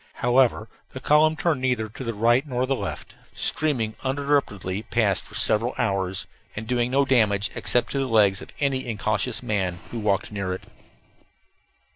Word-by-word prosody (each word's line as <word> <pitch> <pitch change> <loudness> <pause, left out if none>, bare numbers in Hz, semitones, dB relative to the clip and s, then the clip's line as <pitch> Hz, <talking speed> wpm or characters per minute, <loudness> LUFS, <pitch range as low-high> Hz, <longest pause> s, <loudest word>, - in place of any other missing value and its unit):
However, 120 -3 +2 0.3
the 130 - -6
column 150 +3 +4
turned 155 -4 0
neither 125 -4 0
to 110 +5 -9
the 115 -2 -4
right 120 +6 +3
nor 125 -1 -1
the 135 +1 0
left, - - -6 0.2
streaming 125 -9 0
uninterruptedly 130 -9 -1
past 110 -4 0
for - - -12
several 115 +4 +2
hours, 95 -5 -1 0.3
and 110 - -5
doing 120 +1 0
no 140 +2 +2
damage 105 -6 +2
except 120 - +2
to 140 - -1
the 135 - 0
legs 105 -4 +3
of - - -10
any 135 -3 0
incautious 110 -2 -1
man 95 -5 -1
who 120 - -4
walked 105 -2 0
near 100 -3 -3
it. - - -11
120 Hz, 165 wpm, -24 LUFS, 105-130 Hz, 0.3 s, column